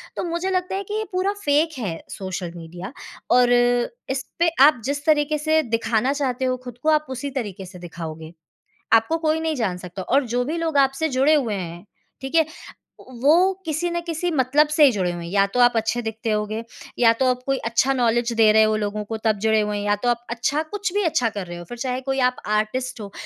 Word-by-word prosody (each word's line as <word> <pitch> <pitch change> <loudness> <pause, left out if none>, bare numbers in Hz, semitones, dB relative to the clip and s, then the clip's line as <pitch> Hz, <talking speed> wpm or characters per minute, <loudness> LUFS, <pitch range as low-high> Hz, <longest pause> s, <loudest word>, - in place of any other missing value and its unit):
तो - - -3
मुझे 345 +2 -2
लगता 365 0 -1
है 395 - -2
कि 415 - -7
ये 435 - -1
पूरा 375 +2 0
फेक 300 +1 +2
है 185 -8 -3
सोशल 185 -2 -5
मीडिया 175 +6 -8 0.4
और 245 0 +5 0.6
इसपे 270 +6 0 0.2
आप 290 -5 +4
जिस 285 +1 -3
तरीके 300 -1 +2
से 315 +1 +2
दिखाना 230 +2 0
चाहते 265 -3 -1
हो 255 0 0
खुद 245 -2 -9
को 315 - +2
आप 305 -1 +3
उसी 260 +2 -4
तरीके 200 -5 -6
से 180 0 -12
दिखाओगे। 165 -2 -8 0.6
आपको 225 +9 +4
कोई 320 0 0
नहीं 320 -1 -1
जान 210 -8 -1
सकता 180 +1 -7
और 275 +8 +2
जो 245 0 +1
भी 310 +6 -3
लोग 325 -3 0
आपसे 270 +3 +2
जुड़े 275 +2 +3
हुए 250 -8 +1
हैं, 175 -2 -6 0.4
ठीक 270 +4 -7
है, 325 -2 +5 0.5
वो 295 +10 +3
किसी 325 +2 -1
न 345 0 -1
किसी 335 +1 -2
मतलब 295 0 +3
से 300 0 +4
ही 280 - +7
जुड़े 185 -4 -1
हुए 175 -1 -6
हैं। 170 - -7
या 200 0 +4
तो 250 - +2
आप 245 -1 +5
अच्छे 225 +2 0
दिखते 225 0 -4
होगे, 215 +1 -1 0.4
या 230 -2 +6
तो 260 - +3
आप 250 0 -1
कोई 270 -1 +1
अच्छा 235 +4 +2
नॉलेज़ 240 -1 +1
दे 220 -1 +6
रहे 220 0 +6
हो 215 0 +2
लोगों 210 0 -3
को 225 +2 -4
तब 215 -2 +2
जुड़े 220 0 +4
हुए 210 0 -1
हैं, 205 - -4
या 205 - +3
तो 245 - +1
आप 240 0 -2
अच्छा 245 +6 0
कुछ 410 -3 -2
भी 410 - +2
अच्छा 255 -8 +2
कर 200 -4 -5
रहे 175 0 -7
हो, 175 - -8
फिर 240 - -8
चाहे 255 0 -2
कोई 270 - 0
आप 250 - -20 0.2
आर्टिस्ट 250 +3 -3
हो, 200 - -8
250 Hz, 230 wpm, -22 LUFS, 215-300 Hz, 0.6 s, ही